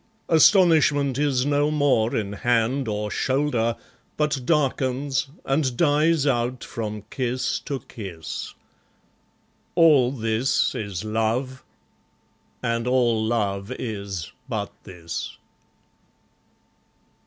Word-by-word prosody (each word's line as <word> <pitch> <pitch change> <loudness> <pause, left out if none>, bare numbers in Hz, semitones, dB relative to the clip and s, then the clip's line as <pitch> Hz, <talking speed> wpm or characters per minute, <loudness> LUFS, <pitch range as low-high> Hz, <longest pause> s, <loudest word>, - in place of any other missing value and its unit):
Astonishment 155 -6 +4
is 135 -3 +1
no 145 +1 +2
more 140 -7 +2
in 105 -2 -2
hand 120 +4 +1
or 105 -1 -2
shoulder, 130 -4 0 0.4
But 150 -3 0
darkens, 135 -2 0 0.2
and 135 -3 0
dies 155 -1 +3
out 125 -2 0
from 105 -2 -5
kiss 125 -1 -1
to 140 -2 -3
kiss. 95 -8 -7 1.2
All 150 -7 +5
this 115 0 0
is 100 -4 -4
love; 115 +4 -1 1.0
and 115 0 -1
all 120 -3 +2
love 100 -3 -1
is 100 -7 -5 0.2
but 105 -3 -3
this. 85 -4 -6
125 Hz, 95 wpm, -24 LUFS, 110-145 Hz, 1.2 s, All